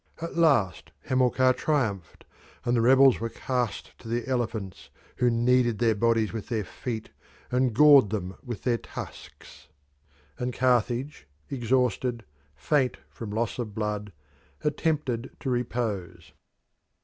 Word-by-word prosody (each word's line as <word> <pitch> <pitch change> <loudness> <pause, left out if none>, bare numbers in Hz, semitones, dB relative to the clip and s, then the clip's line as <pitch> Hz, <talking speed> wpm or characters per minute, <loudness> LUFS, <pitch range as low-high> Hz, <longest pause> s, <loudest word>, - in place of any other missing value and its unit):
At 165 +1 -6
last 135 - +2
Hamilcar 130 0 +3
triumphed, 110 - -2 0.4
and 120 - +2
the 115 - +3
rebels 130 +2 +6
were 115 - -3
cast 125 -5 -3
to - - -12
the 120 +1 -2
elephants, 115 -7 -3 0.3
who 125 - +3
kneaded 120 0 +2
their 115 -1 +3
bodies 115 0 +1
with 110 -3 -6
their 110 -3 -1
feet 110 +2 -6 0.4
and 125 0 +2
gored 140 -2 +7
them 95 -3 -4
with 120 -4 -6
their 120 -2 +1
tusks; - - -10 0.7
and 125 0 -3
Carthage, 125 - 0 0.2
exhausted, 125 -1 0 0.3
faint 135 -4 +1
from 115 - -7
loss 115 +3 -2
of 110 -4 -4
blood, 105 -1 -3 0.5
attempted 150 -5 -1
to 130 - -2
repose. 100 -9 -3
120 Hz, 125 wpm, -27 LUFS, 110-130 Hz, 0.7 s, gored